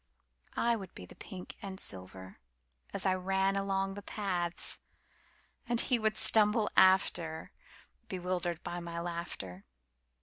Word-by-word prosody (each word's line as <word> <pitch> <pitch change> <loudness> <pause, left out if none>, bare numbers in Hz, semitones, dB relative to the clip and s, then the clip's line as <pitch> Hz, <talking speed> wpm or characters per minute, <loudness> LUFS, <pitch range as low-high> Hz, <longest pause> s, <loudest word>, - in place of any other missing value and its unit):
I 235 0 +3
would 195 -5 -8
be 90 - -8
the - - -13
pink 185 -1 -8
and 190 -1 -5
silver 95 0 -3 0.5
as 200 - -3
I 190 - +4
ran 190 +1 +1
along 195 0 0
the 205 - -7
paths, 180 -4 -2 0.9
And 240 -1 +4
he 245 -1 +4
would 215 -1 +1
stumble 210 0 +5
after, 180 -4 +4 0.6
Bewildered 180 -2 -2
by 175 - -3
my 170 -1 -5
laughter. 170 - -5
185 Hz, 130 wpm, -33 LUFS, 170-195 Hz, 0.9 s, stumble